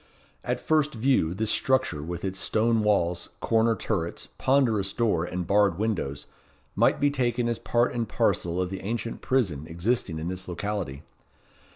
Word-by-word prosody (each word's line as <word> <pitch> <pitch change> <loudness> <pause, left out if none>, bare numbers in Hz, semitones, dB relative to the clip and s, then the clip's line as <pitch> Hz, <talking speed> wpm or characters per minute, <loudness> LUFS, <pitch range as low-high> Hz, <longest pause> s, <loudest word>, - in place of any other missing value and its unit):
At - - -1
first 155 -3 +1
view, 110 -8 +2
this 110 +2 0
structure, 130 - +1
with 85 +4 -5
its 95 0 -3
stone 110 +3 +2
walls, 90 -5 +1
corner 115 0 +2
turrets, 90 -7 -3
ponderous 115 -8 +2
door, 105 -8 +1
and 90 0 -3
barred 100 -1 +3
windows, 90 -10 -2 0.5
might - - +3
be 145 0 +3
taken 120 -3 0
as 120 -1 -1
part 120 +1 +1
and 115 -2 -2
parcel 85 +1 0
of 90 0 -1
the 95 - -5
ancient 115 +3 -4
prison 90 - 0
existing 85 +1 -1
in 80 +2 -4
this 90 +1 -4
locality. 90 -6 -4
105 Hz, 160 wpm, -26 LUFS, 85-120 Hz, 0.5 s, barred